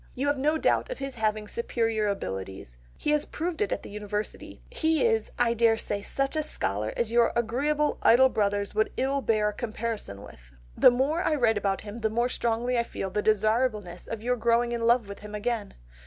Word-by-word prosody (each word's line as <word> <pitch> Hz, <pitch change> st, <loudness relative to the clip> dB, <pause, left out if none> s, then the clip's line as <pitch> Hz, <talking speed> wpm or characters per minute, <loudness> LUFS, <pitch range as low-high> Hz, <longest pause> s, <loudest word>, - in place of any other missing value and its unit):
You 265 Hz, -, -2 dB
have 285 Hz, 0 st, +1 dB
no 305 Hz, +3 st, +2 dB
doubt 315 Hz, -, +1 dB
of -, -, -4 dB
his 275 Hz, -1 st, -5 dB
having 215 Hz, -2 st, -1 dB
superior 225 Hz, -1 st, -1 dB
abilities, 95 Hz, -, -5 dB, 0.2 s
he -, -, -1 dB
has 300 Hz, -1 st, +2 dB
proved 335 Hz, +2 st, -4 dB
it 420 Hz, -, 0 dB
at -, -, -2 dB
the -, -, -9 dB
University, 210 Hz, 0 st, -5 dB
he 320 Hz, -6 st, +1 dB
is, 450 Hz, -1 st, +1 dB
I 235 Hz, -1 st, +3 dB
dare 230 Hz, -1 st, +3 dB
say, 205 Hz, -2 st, -3 dB
such 275 Hz, +7 st, -2 dB
a 310 Hz, -, +1 dB
scholar 105 Hz, -, 0 dB
as 235 Hz, -2 st, -1 dB
your 235 Hz, 0 st, +4 dB
agreeable 285 Hz, +6 st, 0 dB
idle 260 Hz, +3 st, +6 dB
brothers 205 Hz, -3 st, 0 dB
would 215 Hz, +1 st, +1 dB
ill 275 Hz, +2 st, 0 dB
bear 215 Hz, -4 st, +2 dB
a -, -, -6 dB
comparison 220 Hz, -, -5 dB
with. -, -, -15 dB, 0.2 s
The -, -, +7 dB
more 270 Hz, +7 st, +1 dB
I 320 Hz, -4 st, +1 dB
write 225 Hz, -6 st, +2 dB
about 195 Hz, -1 st, -1 dB
him 210 Hz, +2 st, -8 dB
the 220 Hz, -1 st, 0 dB
more 235 Hz, +3 st, 0 dB
strongly 240 Hz, +1 st, 0 dB
I -, -, +2 dB
feel 195 Hz, -4 st, -5 dB
the 210 Hz, -, 0 dB
desirableness 215 Hz, -3 st, 0 dB
of 225 Hz, -1 st, -6 dB
your 250 Hz, +1 st, +1 dB
growing 235 Hz, +1 st, +2 dB
in 230 Hz, -1 st, -1 dB
love 235 Hz, -2 st, +3 dB
with 200 Hz, 0 st, -8 dB
him 210 Hz, 0 st, -8 dB
again.... 220 Hz, 0 st, -3 dB
230 Hz, 210 wpm, -27 LUFS, 210-260 Hz, 0.2 s, The